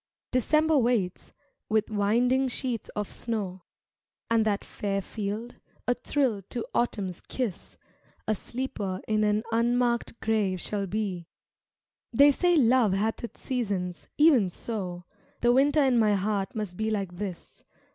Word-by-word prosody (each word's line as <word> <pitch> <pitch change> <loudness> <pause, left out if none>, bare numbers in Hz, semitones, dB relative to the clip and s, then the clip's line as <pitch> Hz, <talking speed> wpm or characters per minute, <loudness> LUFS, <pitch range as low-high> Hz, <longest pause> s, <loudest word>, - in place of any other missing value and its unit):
December 305 +4 +3
waits, 230 -7 0 0.4
with 220 0 +1
winding 240 +6 +2
sheets 245 -2 -3
of 210 -1 -3
snow, 200 -6 -4 0.7
And 225 -1 +4
that 205 -2 0
fair 195 -1 -2
field, 210 +4 -5 0.3
a 245 - +4
thrill 250 -5 0
to 240 -2 -3
Autumn's 195 -7 -1
kiss, 240 -9 -4 0.5
A 215 - +3
sleeper 210 -4 -4
in 215 -1 +2
an 210 +1 +2
unmarked 235 0 +1
grave 210 -4 +1
shall 200 +2 -2
be; 190 -4 -3 0.8
They 280 +5 +7
say 350 +5 +2
love 245 - +4
hath 215 +4 -1
its 235 - -8
seasons; 200 -9 -3
even 285 - +5
so 180 -3 -5 0.4
The 240 0 +4
Winter 285 +3 +4
in 255 -3 +3
my 210 -2 +4
heart 200 +1 -1
must 205 -5 -4
be 220 0 0
like 200 -4 -1
this. 185 -1 -7
220 Hz, 135 wpm, -28 LUFS, 200-245 Hz, 0.8 s, They